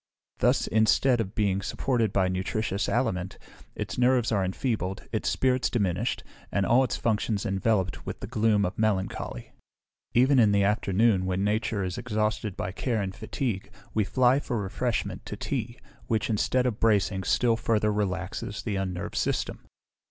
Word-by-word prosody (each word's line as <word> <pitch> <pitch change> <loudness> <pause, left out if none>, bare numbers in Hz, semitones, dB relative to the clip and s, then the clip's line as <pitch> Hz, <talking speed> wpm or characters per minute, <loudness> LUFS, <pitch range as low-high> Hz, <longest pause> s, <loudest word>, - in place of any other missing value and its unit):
Thus, - - +3
instead 115 +3 +3
of 100 -1 -5
being 100 -3 +1
supported 115 -1 0
by 95 -1 +2
nutritious 95 +2 -1
aliment, 95 -7 -1 0.4
its - - -4
nerves 125 -2 +3
are 100 -3 +2
enfeebled, 95 0 -2
its - - 0
spirits 130 -1 +1
diminished, 95 -7 -1 0.3
and 100 - +1
all 125 +5 +5
its 130 - -1
functions 110 -1 0
enveloped 95 -2 0
with - - -6
the - - -5
gloom 110 -2 +2
of 90 +3 -4
melancholy. 95 - -1 0.6
Even 130 +2 +5
in 105 -3 +5
the 100 0 +3
afternoon, 100 -1 +2
when 95 +1 0
nature 105 0 0
is 90 +2 -3
exhausted 110 -3 -1
by 90 - -3
care 115 +3 -1
and 95 -2 -3
fatigue, 110 -2 -3 0.2
we 110 - +2
fly 130 +5 +3
for 120 -5 -3
refreshment 110 +4 -2
to - - -5
tea, 120 -3 -3 0.3
which, 110 0 0
instead 125 +4 +1
of 120 -4 -1
bracing, 100 -3 +2
still 115 +5 +2
further 110 -2 +1
relaxes 100 +1 -3
the 105 -4 -2
unnerved 90 -2 -3
system. - - -1
105 Hz, 160 wpm, -27 LUFS, 95-115 Hz, 0.6 s, all